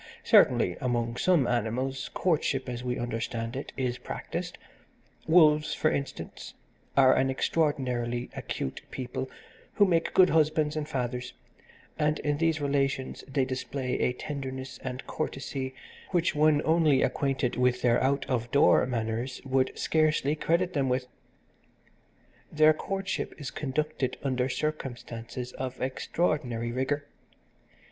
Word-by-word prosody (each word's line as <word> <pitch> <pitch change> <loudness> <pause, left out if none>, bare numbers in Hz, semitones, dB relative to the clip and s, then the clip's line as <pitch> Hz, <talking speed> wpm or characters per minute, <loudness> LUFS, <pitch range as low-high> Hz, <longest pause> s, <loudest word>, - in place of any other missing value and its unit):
Certainly, 90 - +5
among 120 -2 0
some 175 -5 +3
animals 125 +3 -1
courtship, 145 -6 +1
as 125 -1 -4
we 125 0 -2
understand 115 0 -3
it, 135 - -5
is 125 -2 -1
practised - - -5 0.7
Wolves, 155 -2 +5
for 155 - +2
instance, 140 -1 -5 0.4
are 130 -1 +7
an 130 - +2
extraordinarily 125 -5 0
acute 65 - -4
people 130 +1 -4 0.5
who 205 - +6
make 170 -3 +1
good 185 0 +6
husbands 155 -1 +2
and 150 -1 -3
fathers, 125 -1 -3 0.7
and 150 0 +2
in 145 -1 -1
these 165 -1 +2
relations 140 -2 -1
they 135 -1 +1
display 130 0 -3
a - - +2
tenderness 130 -1 -6
and 130 0 -5
courtesy 135 -3 -4 0.3
which 175 -2 +1
one 150 0 +3
only 160 -4 +4
acquainted 135 -1 0
with 125 0 +1
their 120 0 +3
out 135 +1 +1
of 120 -2 -1
door 140 - +5
manners 115 +1 -2
would 130 -1 +2
scarcely 155 -2 +2
credit 170 +3 +1
them 140 -4 +1
with. 125 0 0 1.5
Their 155 0 +6
courtship 195 +4 -3
is 140 -3 -5
conducted 150 -1 -2
under 130 -1 0
circumstances 125 -4 -4
of 130 -1 -5
extraordinary 130 -4 -1
rigour. 135 +4 -1
135 Hz, 125 wpm, -28 LUFS, 125-150 Hz, 1.5 s, are